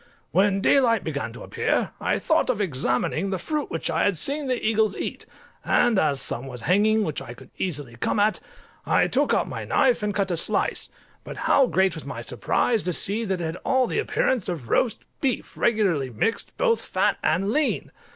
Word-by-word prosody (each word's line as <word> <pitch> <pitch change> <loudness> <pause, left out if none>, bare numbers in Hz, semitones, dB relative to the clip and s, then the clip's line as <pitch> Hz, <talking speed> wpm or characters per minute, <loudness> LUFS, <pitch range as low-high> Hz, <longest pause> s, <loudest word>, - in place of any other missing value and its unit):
When 195 +2 +2
daylight 230 -3 +3
began 140 -7 -3
to - - -10
appear, - - -1
I - - +1
thought - - +1
of - - 0
examining 150 +1 0
the 190 - -1
fruit 300 - -3
which 165 - -3
I 160 - +1
had 200 -4 +1
seen 280 - -1
the 255 -2 0
eagles 215 -2 +1
eat, - - -5 0.4
and 240 -5 +3
as 145 -5 +2
some 130 0 -2
was 125 -3 -8
hanging 210 - +3
which 155 -7 -3
I 120 - -9
could 130 +1 -15
easily 145 -9 -3
come 165 - 0
at, 210 +1 +2 0.4
I - - +3
took - - +1
out - - +1
my - - -5
knife 250 -4 +2
and 210 0 -1
cut 195 -2 -1
a 175 - 0
slice; - - 0 0.3
but - - -8
how 270 -2 +4
great 190 -4 +2
was 160 - -7
my 135 -4 -6
surprise 210 - 0
to 180 - -2
see 210 +7 +2
that 190 -3 -2
it - - -2
had 160 +2 -3
all 260 -1 +2
the 245 - -1
appearance 260 - 0
of 150 -10 -5
roast 240 - +1 0.2
beef 265 -4 -2
regularly 190 - +1
mixed, 125 - -2
both 465 -2 +2
fat - - 0
and 195 +3 +1
lean! 300 +3 0
195 Hz, 200 wpm, -24 LUFS, 155-230 Hz, 0.4 s, how